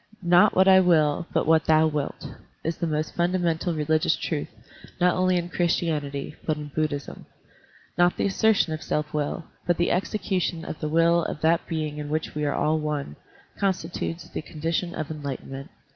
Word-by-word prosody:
"Not 175 +4 +5
what 190 +1 +5
I 190 0 +8
will, 165 -3 +3
but - - +1
what 160 0 +4
thou 155 0 +5
wilt," 150 -3 -3 0.4
is 165 +1 -2
the 170 - -1
most 155 0 -2
fundamental 175 -1 0
religious 155 +1 +2
truth, 155 -3 -3 0.5
not 180 0 +3
only 185 0 +2
in 175 0 -2
Christianity, 155 -5 -1
but 155 -1 -1
in 150 -1 -7
Buddhism. 150 -2 -3 0.7
Not 175 0 +4
the - - 0
assertion 200 -4 +2
of 155 - -5
self 150 0 -2
will, 150 +2 -2 0.2
but 175 - +2
the 175 - +1
execution 180 -3 -1
of - - -6
the 155 - -2
will 165 +2 +3
of - - -5
that 165 +1 +2
being 155 -2 -3
in 145 0 -5
which 155 +1 -2
we 150 0 -2
are 145 - 0
all 155 +1 +1
one, 150 - -3 0.4
constitutes 175 -3 -2
the - - -5
condition 165 +3 -3
of 155 -1 -4
enlightenment. 140 -2 -6
160 Hz, 175 wpm, -25 LUFS, 150-175 Hz, 0.7 s, I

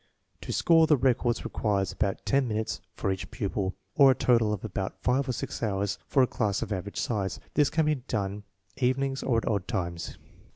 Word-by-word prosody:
To - - -5
score 165 -1 +4
the 150 - +5
records 125 -2 +1
requires 100 -3 0
about 100 -2 -2
ten 135 -2 +2
minutes 110 -1 -2
for 95 - -1
each 95 - -4
pupil, 95 -2 -2 0.2
or 140 -2 +7
a 130 - +5
total 115 -5 +3
of 105 0 -3
about 95 -2 -4
five 130 +2 +1
or - - +3
six - - -5
hours 100 -2 -1
for 135 - +4
a - - +6
class 110 -4 -1
of 105 -2 -3
average 100 +2 -5
size. 100 -5 -2
This 150 -2 +3
can 160 0 +1
be 155 - +3
done 105 -7 -3 0.4
evenings 135 +1 0
or 120 -3 +1
at 115 - -1
odd 100 -4 0
times. 85 -2 -3
110 Hz, 200 wpm, -28 LUFS, 100-130 Hz, 0.4 s, or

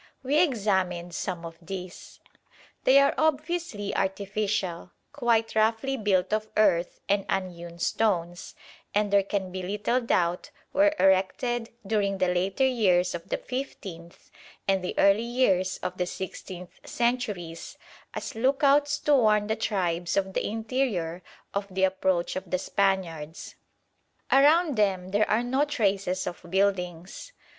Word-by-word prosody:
We 290 +4 +3
examined 190 - 0
some 175 -1 -4
of 165 0 -9
these. 185 +1 -8 0.7
They 265 - +6
are 280 0 +5
obviously 310 - -1
artificial, 195 -2 -2 0.2
quite 225 -1 +1
roughly 225 +5 +1
built 195 -5 +1
of 215 0 -1
earth 180 -5 +2
and 200 0 +2
unhewn 175 -3 -3
stones, 175 -3 -1 0.4
and, 205 -1 +1
there 200 - +6
can 195 -1 -3
be 185 0 -4
little 210 +6 -1
doubt, 180 -6 0 0.2
were 300 +1 +4
erected 225 +5 +2 0.2
during 200 -1 0
the 185 -1 +1
later 190 +8 +1
years 185 -8 +2
of 170 -1 -7
the - - 0
fifteenth 190 -10 -7 0.4
and 195 -1 +2
the 180 - -3
early 200 +2 +5
years 200 -7 +1
of 180 +1 -4
the 180 - 0
sixteenth 180 -1 -8
centuries 210 -9 -2 0.4
as - - -5
"look 265 +6 0
outs" 285 +1 +4
to 295 - +3
warn 215 -5 +4
the 220 +1 -1
tribes 175 -6 -1
of 190 -1 0
the - - -1
interior 220 -7 -2 0.3
of 200 0 -2
the 190 0 -1
approach 185 -2 +1
of 185 -1 -5
the 185 - +1
Spaniards. 180 -5 -2 0.8
Around 295 +1 +5
them 190 -3 +1 0.2
are 220 +3 +2
no 260 +4 +1
traces 200 -9 0
of 175 - -5
buildings. 190 - -1
195 Hz, 135 wpm, -27 LUFS, 180-235 Hz, 0.8 s, They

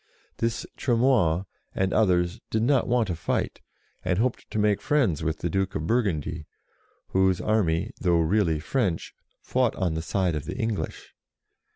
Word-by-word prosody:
This 115 0 -1
Tremoille, 115 - +2 0.3
and 95 0 0
others, 90 -5 +2
did 110 0 0
not 135 +1 +3
want 120 -1 +2
to 90 - -1
fight, 85 - -2 0.4
and 90 - 0
hoped 125 +3 -1
to - - -4
make 105 -1 +2
friends 125 - +1
with 80 0 -1
the - - 0
Duke 95 +2 -1
of 75 - -2
Burgundy, 85 - -1 0.6
whose 95 -1 +2
army, 100 -2 +1
though 85 -3 +3
really 85 -1 +2
French, 95 - -1 0.3
fought 125 -3 +1
on 90 -4 0
the 80 - -2
side 90 0 0
of 75 - -4
the - - -5
English. 110 -4 -3
95 Hz, 160 wpm, -26 LUFS, 85-115 Hz, 0.6 s, not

